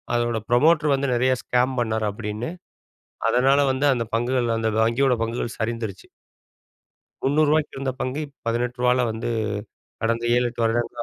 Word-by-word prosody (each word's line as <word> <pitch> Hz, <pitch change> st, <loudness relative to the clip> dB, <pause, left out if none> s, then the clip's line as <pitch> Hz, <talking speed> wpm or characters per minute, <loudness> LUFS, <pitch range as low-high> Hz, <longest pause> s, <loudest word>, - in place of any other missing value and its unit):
அதோட 120 Hz, -1 st, 0 dB
ப்ரமோட்டர் 150 Hz, +4 st, +4 dB
வந்து 140 Hz, +1 st, -1 dB
நிறையா 130 Hz, +2 st, +3 dB
ஸ்கேம் 125 Hz, +1 st, +1 dB
பண்ணாரு 110 Hz, -2 st, 0 dB
அப்டின்னு, 105 Hz, +5 st, -5 dB, 0.8 s
அதனால 135 Hz, +4 st, +4 dB
வந்து 135 Hz, +2 st, 0 dB
அந்த 120 Hz, -2 st, 0 dB
பங்குகள் 120 Hz, -1 st, +1 dB
அந்த 110 Hz, 0 st, 0 dB
வங்கியோட 125 Hz, +3 st, +3 dB
பங்குகள் 115 Hz, 0 st, -4 dB
சரிந்துருச்சு. 110 Hz, -4 st, -4 dB, 1.2 s
ரூ.300க்கு 150 Hz, +2 st, +2 dB
இருந்த 135 Hz, -1 st, -2 dB
பங்கு 130 Hz, +4 st, -2 dB, 0.3 s
ரூ.18ல 125 Hz, +2 st, +1 dB
வந்து, 115 Hz, +2 st, -4 dB, 0.7 s
கடந்த 115 Hz, +1 st, 0 dB
7,8 120 Hz, -1 st, 0 dB
வருடங்களா 120 Hz, +1 st, -1 dB
120 Hz, 125 wpm, -23 LUFS, 115-130 Hz, 1.2 s, ப்ரமோட்டர்